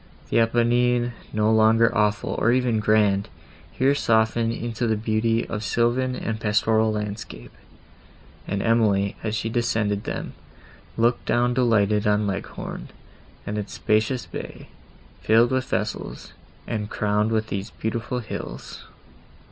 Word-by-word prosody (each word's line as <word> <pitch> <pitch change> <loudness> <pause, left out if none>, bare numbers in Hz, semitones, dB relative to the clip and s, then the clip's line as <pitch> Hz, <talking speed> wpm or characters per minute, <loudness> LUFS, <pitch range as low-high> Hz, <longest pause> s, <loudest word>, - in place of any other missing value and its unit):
The - - +4
Apennines, 120 +1 +2 0.2
no 105 0 +2
longer 110 +1 +4
awful, 105 0 +1
or 120 - +3
even 125 -3 +2
grand, 105 -1 +2 0.4
here 135 +8 +2
softened 115 -3 +2
into 120 0 -3
the 110 - +2
beauty 115 +1 0
of 105 -1 -4
sylvan 120 +3 +1
and 110 -3 -3
pastoral 110 +1 +2
landscape; 105 - -6 1.0
and 100 0 -2
Emily, 105 -4 +2
as 110 -1 -2
she 110 - -2
descended 110 -3 0
them, - - -4 0.6
looked 120 +1 +1
down 120 +1 +2
delighted 105 -4 +2
on 105 0 +2
Leghorn, 100 -1 -5 0.6
and 105 +1 -3
its 105 - -6
spacious 110 +4 0
bay, - - -8 0.5
filled 115 +3 +4
with 130 0 0
vessels, - - -4 0.3
and 105 -2 -3
crowned 105 +1 0
with 110 -1 0
these 100 0 -4
beautiful 115 +2 -3
hills. 110 - -7
110 Hz, 130 wpm, -24 LUFS, 105-120 Hz, 1.0 s, The